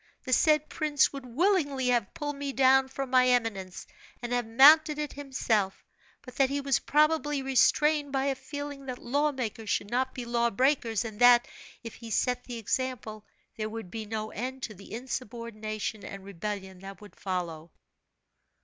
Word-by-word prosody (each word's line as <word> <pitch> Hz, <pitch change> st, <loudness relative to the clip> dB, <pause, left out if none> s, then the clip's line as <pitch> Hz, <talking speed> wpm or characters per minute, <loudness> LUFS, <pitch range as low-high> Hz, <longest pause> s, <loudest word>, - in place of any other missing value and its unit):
The 255 Hz, -, -2 dB
said 305 Hz, +2 st, +4 dB
prince 295 Hz, -3 st, +1 dB
would 275 Hz, -2 st, -8 dB
willingly 285 Hz, -, +1 dB
have 240 Hz, -5 st, 0 dB
pulled 290 Hz, -1 st, -4 dB
me 280 Hz, -1 st, -4 dB
down 265 Hz, 0 st, +4 dB
from 265 Hz, 0 st, -5 dB
my 255 Hz, -1 st, +5 dB
eminence, 225 Hz, -7 st, -1 dB, 0.4 s
and 240 Hz, 0 st, -3 dB
have 245 Hz, -2 st, 0 dB
mounted 300 Hz, +6 st, +7 dB
it 300 Hz, -1 st, -4 dB
himself; 235 Hz, -8 st, -1 dB, 0.4 s
but 250 Hz, -, -12 dB
that 270 Hz, -1 st, +3 dB
he 280 Hz, +1 st, -1 dB
was 275 Hz, -2 st, +1 dB
probably 295 Hz, -1 st, +1 dB
restrained 290 Hz, +2 st, +3 dB
by 270 Hz, 0 st, 0 dB
a 280 Hz, -, +1 dB
feeling 280 Hz, +1 st, -7 dB
that 255 Hz, -1 st, -4 dB
law 285 Hz, +5 st, 0 dB
makers 225 Hz, -5 st, -5 dB
should 205 Hz, -, -1 dB
not 260 Hz, +2 st, -1 dB
be 245 Hz, -, -5 dB
law 235 Hz, 0 st, +1 dB
breakers, 235 Hz, -2 st, +1 dB
and 220 Hz, -1 st, -7 dB
that, 245 Hz, -1 st, +6 dB, 0.4 s
if 230 Hz, -, -7 dB
he 230 Hz, -, -10 dB
set 250 Hz, +2 st, 0 dB
the 245 Hz, -2 st, -6 dB
example, 225 Hz, -2 st, -3 dB, 0.3 s
there 215 Hz, -1 st, -3 dB
would 220 Hz, -5 st, -7 dB
be 220 Hz, -2 st, -6 dB
no 215 Hz, 0 st, -4 dB
end 260 Hz, +3 st, -5 dB
to 215 Hz, -, -4 dB
the 195 Hz, 0 st, -14 dB
insubordination 225 Hz, -3 st, -5 dB
and 195 Hz, -1 st, -8 dB
rebellion 195 Hz, 0 st, -6 dB
that 195 Hz, -1 st, -10 dB
would 205 Hz, -4 st, -14 dB
follow." 170 Hz, -4 st, -4 dB
250 Hz, 175 wpm, -28 LUFS, 215-275 Hz, 0.4 s, mounted